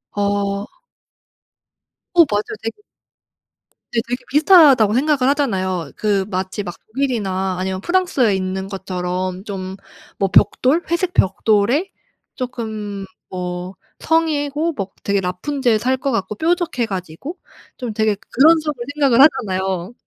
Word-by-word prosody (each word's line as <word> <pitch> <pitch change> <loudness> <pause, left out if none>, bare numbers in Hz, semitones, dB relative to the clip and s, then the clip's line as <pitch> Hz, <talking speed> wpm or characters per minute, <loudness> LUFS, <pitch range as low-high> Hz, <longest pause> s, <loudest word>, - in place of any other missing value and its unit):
어 200 0 0 1.5
어 340 - +9
맞아요. 205 0 -1
되게 225 - -5 1.1
네 235 - +1
되게 245 +2 -3
비슷하다고 290 - +6
생각을 285 +2 +2
하잖아요. 185 - -1
그 200 -3 0
마치 190 +2 -3
막 175 -2 -6
독일이나 205 -7 -1
아니면 185 0 -2
프랑스에 345 - +2
있는 190 0 -3
것처럼 185 -1 -4
좀 195 -3 -5 0.5
뭐 195 -1 +1
벽돌 295 +7 +3
회색 355 +1 0
벽돌에 215 - +2 0.4
쪼끔 215 -6 -5 0.2
뭐 180 0 -5 0.2
성이고 315 0 0
막 195 -6 -5
되게 200 -1 +1
라푼젤 225 +7 0
살 260 +3 +1
것 275 +1 -2
같고 210 -2 -2
뾰족해 330 - 0
가지고 190 - -6 0.4
좀 245 -5 -4
되게 215 -1 +1 0.2
그런 320 +5 +6
쪽으로 300 -6 -4
생각을 270 -4 +4
하잖아요. 190 - +2
215 Hz, 265 characters per minute, -19 LUFS, 190-280 Hz, 1.5 s, 어